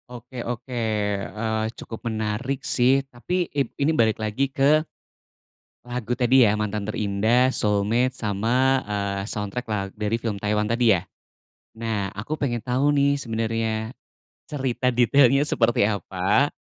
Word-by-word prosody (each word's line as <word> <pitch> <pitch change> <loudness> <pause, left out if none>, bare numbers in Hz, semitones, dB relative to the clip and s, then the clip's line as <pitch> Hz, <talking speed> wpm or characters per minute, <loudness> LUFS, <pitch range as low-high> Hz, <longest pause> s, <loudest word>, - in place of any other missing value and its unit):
Oke 125 +1 -8
oke, 120 +1 -5 0.4
eee, 110 +2 -2
cukup 115 +1 -6
menarik 110 +5 -3
sih, 135 +2 +3
tapi, 175 +8 -2
i 145 - +1 0.2
ini 140 +3 +2
balik 110 -7 +2
lagi 110 +5 -1
ke 140 +3 +3 1.0
lagu 120 -1 -3
tadi 130 +1 +4
ya, 105 -3 +4
Mantan 105 -1 -2
Terindah, 110 +5 +2
Soulmate 110 +5 +1
sama, 120 +6 +1
eee, 100 -2 -3
soundtrack 105 +4 -4
la 105 -1 0
dari 105 +1 -1
film 110 -4 -4
Taiwan 105 0 +1
tadi 115 -2 +3
ya? 85 - -8 0.7
Nah 110 -4 -2
aku 105 +8 -6
pengen 120 -4 0
tahu 130 +3 +1
nih 140 0 +4
sebenarnya, 115 -1 -2 0.6
cerita 130 -3 -1
detailnya 130 +3 +4
seperti 115 -7 +2
apa? 100 - +1
115 Hz, 135 wpm, -24 LUFS, 105-130 Hz, 1.0 s, tadi